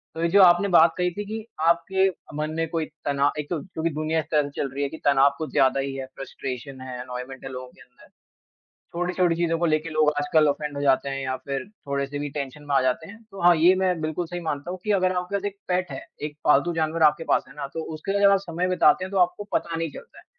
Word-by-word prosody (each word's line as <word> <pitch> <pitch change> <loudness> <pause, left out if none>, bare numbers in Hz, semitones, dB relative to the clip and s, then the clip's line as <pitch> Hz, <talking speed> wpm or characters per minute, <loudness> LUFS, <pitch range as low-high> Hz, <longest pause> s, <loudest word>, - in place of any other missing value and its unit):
तो 165 - -4
ये 170 - +3
जो 200 +4 +6
आपने 175 +2 +6
बात 170 -2 +6
कही 180 0 +1
थी 205 +4 -5
कि 215 +1 -6 0.2
आपके 190 +3 +3 0.3
मन 155 0 -2
में 165 0 0
कोई 165 -1 -1 0.2
तना 140 0 +2
एक 150 - -5
तो 170 -4 -1
क्योंकि 165 0 -3
दुनिया 155 +1 -1
ऐसे-तैसे 150 -2 0
चल 140 - -1
रही 140 +1 -2
है 140 - -1
कि 160 - -8
तनाव 140 0 +5
कुछ 155 - -5
ज़्यादा 135 0 +3
ही 135 0 -2
है, 135 -1 -4
फ़्रस्ट्रेशन 130 0 -7
है, 125 -1 -7
अनोयमेंट 125 +1 -7
है - - -5
लोगों 130 0 -7
के - - -19
अंदर। 125 - -20 0.9
छोटी-छोटी 180 0 +1
चीज़ों 165 -1 0
को 170 - +1
लेके 155 0 0
लोग 155 -1 +3
आजकल 150 +1 +3
ऑफेंड 145 0 -2
हो 140 - -3
जाते 135 -1 +2
हैं 135 0 -3
या 130 0 -1
फिर 135 +3 -4 0.2
थोड़े-से 140 +1 -2
भी 145 0 -3
टेंशन 140 0 -6
में 145 -1 -2
आ - - +5
जाते 130 +6 -1
हैं। 225 - -12
तो 195 - -9
हाँ, 175 0 +7
ये 175 +4 +6
मैं 185 -3 +1
बिल्कुल 155 +3 -2
सही 175 +1 -5
मानता 155 0 -4
हूँ 185 - -5
कि 210 - -2
अगर 185 0 +2
आपका 180 +2 -1
पास 200 - -5
एक 200 0 -4
पेट 180 -2 0
है। 135 - -5 0.2
एक 150 0 -5
पालतू 150 +4 +4
जानवर 160 0 0
आपके 155 +2 +4
पास - - +3
है 135 - -15
ना, 140 - -4
तो 150 +4 -6
उसके 175 +6 -4
साथ 200 0 +5
आप 195 - +4
समय 180 -1 -2
बिताते 185 0 +4
हैं, 190 - -7
तो 195 - +1
आपको 180 +3 +2
पता 170 -1 -1
नहीं 165 -2 -2
चलता 470 - -12
है - - -16
155 Hz, 260 wpm, -25 LUFS, 140-180 Hz, 0.9 s, हाँ